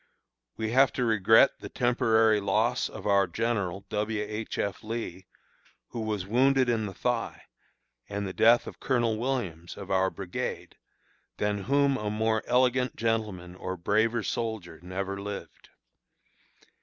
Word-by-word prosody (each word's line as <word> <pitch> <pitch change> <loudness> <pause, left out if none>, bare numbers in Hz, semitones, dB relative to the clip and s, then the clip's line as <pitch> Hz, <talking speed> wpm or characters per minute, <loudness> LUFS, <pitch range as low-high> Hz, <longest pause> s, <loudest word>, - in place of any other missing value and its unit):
We 110 0 -2
have 135 +2 +5
to 125 - 0
regret 110 +3 +5
the - - -8
temporary 110 -3 +3
loss 110 +5 +1
of - - -9
our 100 -2 +3
general 100 -2 -2
(W. 105 +1 -1
H. 110 +1 -5
F. 100 -2 -2
Lee), 110 -5 -5 0.6
who 120 - -6
was 105 -4 -2
wounded 130 +4 +3
in 110 -3 0
the 95 - -7
thigh, 120 -2 -2 0.7
and 100 0 -3
the 95 - -4
death 115 +2 +5
of - - -9
Colonel 120 -4 +1
Williams 105 -10 -3
(of 100 -1 -7
our 95 0 +3
brigade), 95 -2 -5 0.6
than 105 -2 -1
whom 140 0 +3
a 105 -3 -3
more 110 +1 +1
elegant 125 0 +2
gentleman 110 -6 -2
or 95 0 -5
braver 110 +6 +1
soldier 110 -9 -4
never 95 +2 -4
lived. 100 0 -8
110 Hz, 145 wpm, -28 LUFS, 100-120 Hz, 0.7 s, have